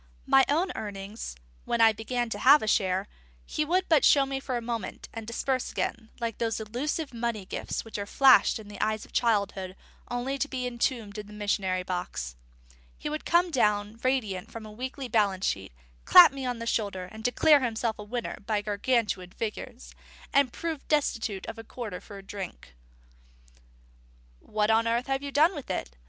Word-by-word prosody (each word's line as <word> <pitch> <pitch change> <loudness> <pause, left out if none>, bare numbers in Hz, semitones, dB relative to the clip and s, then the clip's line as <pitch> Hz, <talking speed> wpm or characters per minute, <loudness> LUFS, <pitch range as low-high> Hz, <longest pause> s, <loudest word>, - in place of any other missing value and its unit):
My 270 - +6
own 340 +6 +2
earnings, 205 - -6 0.3
when 235 - 0
I 225 -1 +7
began 240 +3 -2
to 205 - -3
have 280 +5 +7
a - - -3
share, 190 -2 +1 0.4
he 305 - -1
would 360 +5 +1
but 315 -4 +4
show 280 -2 +6
me 270 0 -3
for 260 -2 -3
a - - -1
moment, 230 -1 -5
and 225 -1 -7
disperse 255 +2 -1
again, 225 -1 -3
like 230 -3 -3
those 225 -1 -1
illusive 260 +7 -3
money 230 -4 -2
gifts - - -4
which 225 -2 -6
are 200 - -4
flashed 265 +2 +6
in 215 -2 -11
the 205 -1 -8
eyes 215 0 0
of - - -21
childhood 200 -5 0 0.3
only 255 +3 -2
to 290 - 0
be 255 -3 -3
entombed 235 -3 -2
in 210 - -8
the 210 - -12
missionary 195 -3 -1
box. 180 - -4 0.4
And - - -28 0.2
he - - -4
would 305 +1 -4
come 345 +1 +3
down 210 -4 +1
radiant 220 -8 0
from 230 -1 -8
a 215 - -9
weekly 260 +4 -5
balance 205 -5 +1
sheet, 95 0 -2 0.3
clap 180 - +9
me 270 -2 -4
on 245 -1 -2
the 230 - -5
shoulder, 200 -5 -1
declare 290 +6 +5
himself 230 -3 -1
a - - -5
winner 235 +3 -4
by 210 -2 0
Gargantuan 210 -3 0
figures, 180 - -6 0.4
and 280 -3 +4
prove 325 -1 -5
destitute 225 -9 0
of 225 - -7
a - - -7
quarter 220 -5 -6
for 205 - -11
a 195 - -10
drink. 190 - -8 1.7
"What 210 - 0
on 225 +1 +3
earth 235 +2 +1
have 270 0 -1
you 280 0 -5
done 310 +6 +4
with 290 - -8
it?" 60 - -3
225 Hz, 190 wpm, -28 LUFS, 205-260 Hz, 1.7 s, clap